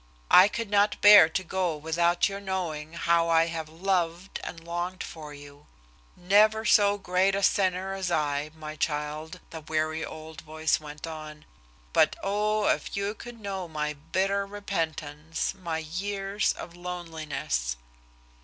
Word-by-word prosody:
I 185 +2 +9
could 230 -1 -4
not 205 0 +3
bear 205 -6 +9
to 185 - -2
go 180 -3 -1
without 170 +3 +2
your 200 -1 -5
knowing 170 -6 -4
how 170 0 +2
I 165 0 +5
have 165 -2 -5
loved 175 +1 -1
and 165 - -6
longed 175 +2 -4
for 155 -2 -9
you. 145 0 -13 0.5
"Never 215 +4 +4
so 205 -2 +5
great 190 0 +1
a 200 - -1
sinner 190 0 +2
as 190 -2 -3
I, 150 -2 0
my 155 -1 -7
child," 150 +1 -3
the 160 - -7
weary 155 +1 -1
old 160 0 -8
voice 155 0 0
went 150 0 -8
on, 155 -2 -8 0.5
"but, - - +4
oh, 210 +1 +1
if - - 0
you 200 +1 -1
could 240 +1 -11
know 195 -3 -4
my 150 -2 -3
bitter 190 +7 -1
repentance, 160 -6 -3
my 170 -4 -4
years 195 +5 -2
of 170 +1 -9
loneliness." 160 - -3
170 Hz, 145 wpm, -27 LUFS, 155-195 Hz, 0.5 s, I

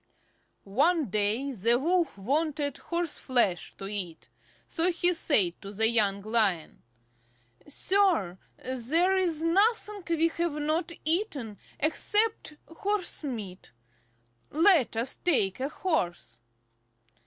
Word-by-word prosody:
One 280 - +1
day 215 +7 0
the 235 +1 +2
Wolf 335 - 0
wanted 285 +5 -1
horse 340 -2 -3
flesh 235 -9 0
to 195 - -7
eat, 190 -5 -5 0.4
so 345 +2 +1
he 350 +1 +3
said 205 - +1
to 200 - -8
the 220 +2 +2
young 200 -4 +1
Lion, 210 -7 0 0.9
"Sir, 310 - +1 0.2
there 285 +10 +1
is 340 -4 0
nothing 415 +4 +2
we 330 0 +2
have 335 -1 -2
not 310 +4 -1
eaten 310 - -1 0.2
except 415 +3 +1
horse 390 +2 -2
meat; 205 - -7 0.8
let 315 - +3
us 235 +3 -2
take 235 - +1
a 270 +2 -2
horse." 175 - -3
290 Hz, 110 wpm, -28 LUFS, 210-340 Hz, 0.9 s, he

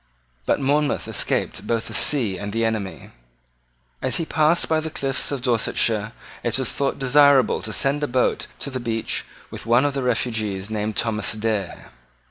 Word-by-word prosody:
But - - +2
Monmouth 145 +2 +1
escaped 100 +2 -1
both 115 -1 0
the - - -7
sea 120 -10 +3
and 100 +2 -5
the 115 +2 0
enemy. 110 -4 -3 0.9
As - - 0
he 165 - -1
passed 155 +2 +2
by 160 -1 +2
the 160 0 -4
cliffs 135 -3 -1
of 135 -3 -3
Dorsetshire, 110 -3 +1 0.3
it 120 0 0
was 130 -3 -1
thought 140 -1 -1
desirable 140 0 +4
to 110 - -4
send 135 +8 +1
a 145 - 0
boat 125 -1 0
to 140 - -4
the 130 - -3
beach 115 -2 -2 0.3
with - - -8
one 120 +4 +4
of 145 - 0
the 135 - -2
refugees 110 -5 -1
named 105 0 -2
Thomas 110 -2 0
Dare. 110 -3 -3
120 Hz, 175 wpm, -22 LUFS, 110-140 Hz, 0.9 s, desirable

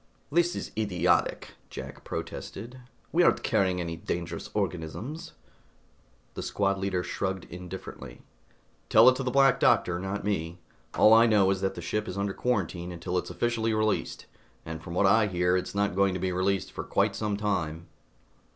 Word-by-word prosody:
"This 175 +3 +2
is - - -5
idiotic," 105 -5 +1 0.2
Jack - - -8
protested. 125 +3 -6 0.3
"We - - +3
aren't - - +3
carrying 95 -2 +1
any 85 -1 -3
dangerous 85 0 -4
organisms!" 110 - -4 1.0
The - - -5
squad 100 -1 0
leader 95 -2 -1
shrugged 95 0 -3
indifferently. 90 -8 -9 0.7
"Tell 110 +3 +7
it 130 - +2
to - - -3
the 130 - -1
Black 135 0 +4
Doctor, 90 0 +3
not 95 +2 -4
me. 85 -4 -2 0.4
All 110 - +7
I 115 +1 +7
know 100 -4 +4
is 95 -1 -1
that 95 0 -1
this 85 - -7
ship 105 +4 -2
is 95 - -5
under 100 0 -1
quarantine 90 -8 -2
until 85 +1 -5
it's 90 - -1
officially 115 -2 0
released, 110 0 -1 0.4
and 80 0 -6
from 85 0 -7
what 100 - +3
I 110 +2 +5
hear, 90 -1 +1
it's 95 +2 -2
not 100 -1 +1
going 95 0 +2
to - - -2
be 95 +1 -1
released 95 +1 0
for - - -5
quite 100 0 +1
some 105 0 -2
time." 85 -6 -2
95 Hz, 170 wpm, -28 LUFS, 90-110 Hz, 1.0 s, Tell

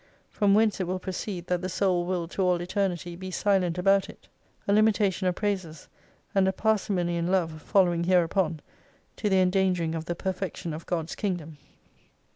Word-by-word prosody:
From 200 -2 +3
whence 215 -1 +3
it 185 - -1
will 185 +1 -1
proceed, 185 -1 -5
that 180 -1 -1
the 185 - -3
soul 180 -2 +1
will 180 -2 -1
to 195 - -3
all 180 -2 +2
Eternity 180 -1 -2
be 185 +2 -7
silent 185 -3 +1
about 195 +1 +3
it. - - -14 0.4
A 200 - +3
limitation 205 -3 +3
of 180 - +1
praises, 185 -7 -3 0.4
and 195 -1 +3
a - - +3
parsi 215 +1 0
mony 175 -2 0
in 170 0 -1
love 165 -4 0
following 175 -3 +2
hereupon, 175 -2 +2 0.6
to 210 - 0
the 190 -1 +4
endangering 180 -3 +2
of 165 -1 -4
the 175 - -3
perfection 185 -2 -4
of 160 +2 -8
God's 165 -2 -2
Kingdom. 175 -7 -4
185 Hz, 180 wpm, -27 LUFS, 175-195 Hz, 0.6 s, the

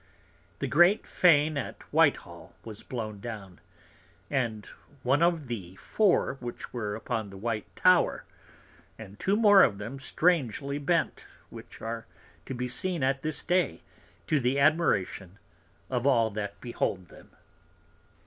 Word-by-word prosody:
The - - -3
great 175 +7 +4
Fane 155 -4 +3
at 130 - -7
Whitehall - - +1
was 110 -2 -9
blown 110 -4 -6
down; 100 -5 -8 0.7
and 115 -6 -1 0.4
one 135 +5 +2
of 170 -3 +2
the 95 -7 -6
four 180 - +1
which 120 -1 -8
were 105 -4 -3
upon 110 -1 -4
the 95 - -11
white 110 +1 -3
Tower, 185 -1 +3 0.7
and 105 -2 -11
two 195 - +1
more 205 -3 +7
of 105 - +3
them 115 +7 -7
strangely 140 -2 0
bent; 165 +4 -1 0.2
which - - -12
are 115 0 -5 0.4
to 135 - -4
be 125 +1 -3
seen 175 +4 0
at 135 0 +1
this 155 -1 -3
Day, 175 - 0 0.4
to 155 - +1
the 125 +2 0
Admiration 105 - +1 0.5
of 125 0 -1
all 115 -5 +3
that 100 -1 -5
behold 95 -7 -3
them. - - -16
125 Hz, 140 wpm, -28 LUFS, 110-155 Hz, 0.7 s, more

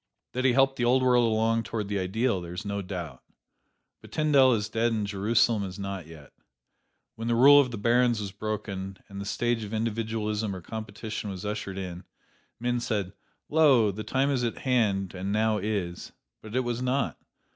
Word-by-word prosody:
That 130 +1 -2
he 130 - +5
helped 135 +1 +3
the 120 - -1
old 130 +2 +3
world 120 -2 +4
along 115 +1 +2
toward 110 -1 -4
the 100 -1 -1
ideal 95 +2 0
there 85 0 -7
is 100 +4 -5
no 100 0 -2
doubt; 90 -8 -6 0.8
but - - -14
Tyndall 140 -5 +4
is 105 -2 -2
dead 115 +2 0
and 110 -2 -1
Jerusalem 105 +2 +2
is 95 0 -6
not 100 -4 -5
yet. 80 -4 -13 0.8
When 115 +1 -6
the 120 - +2
rule 140 +4 +8
of 130 - -1
the 115 - -5
barons 120 +2 +3
was 100 -2 -4
broken, 100 -2 -5
and 100 0 -7
the - - -5
stage 120 +2 -1
of 105 +1 -5
individualism 110 -2 -2
or 90 - -7
competition 110 +1 -6
was 95 +1 -6
ushered 105 -2 -4
in, 90 -1 -6 0.6
men 120 +1 0
said, 100 -5 -2 0.3
"Lo! 140 -9 +5
The 105 +3 -6
time 135 +6 +1
is 130 -3 0
at 115 - -2
hand 105 -7 +1
and 95 +1 -4
now 110 0 +2
is." 95 -4 -3 0.3
But 110 +2 -9
it 130 - +3
was 120 -1 -3
not. 130 +2 -1
110 Hz, 190 wpm, -27 LUFS, 100-120 Hz, 0.8 s, rule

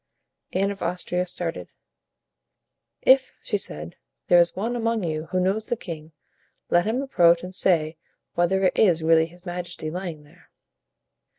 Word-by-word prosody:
Anne 195 +2 +1
of 200 - -8
Austria 180 0 -1
started. 175 -1 -4 1.4
"If," 265 0 +5
she 205 - -1
said, 75 - -5 0.3
"there 175 - +7
is 170 0 +3
one 230 +5 -2
among 230 -2 0
you 155 -1 -3
who 185 - -1
knows 195 +4 0
the 240 - -1
king, 160 -5 -8 0.6
let 175 0 +4
him 235 +5 0
approach 170 -10 +4
and 180 +1 -7
say 165 -4 +1 0.4
whether 185 +3 +1
it 185 - +3
is 170 -6 +3
really 160 0 +4
his 175 +2 -19
majesty 175 -3 -5
lying 175 -4 -5
there." 165 +4 -22
180 Hz, 155 wpm, -24 LUFS, 165-195 Hz, 1.4 s, there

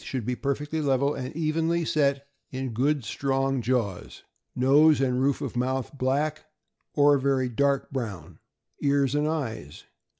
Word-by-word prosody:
485 130 -3 -4
should - - -9
be 125 +1 -1
perfectly 145 +4 -2
level 140 0 +1
and 130 0 -6
evenly 165 +1 0
set 140 -2 +1 0.2
in 130 0 -4
good, 135 +2 0
strong 135 +1 -1
jaws. 115 -5 -2 0.3
Nose 145 +4 +5
and 130 -1 +1
roof 140 0 +1
of - - -4
mouth 130 +2 -2
black, 145 +4 -1 0.5
or 145 -1 +5
very 130 -1 +1
dark 140 +3 0
brown. 110 - -6 0.4
Ears 140 -2 +2
and 150 +1 +1
eyes. 115 - -4
135 Hz, 145 wpm, -26 LUFS, 130-145 Hz, 0.5 s, Nose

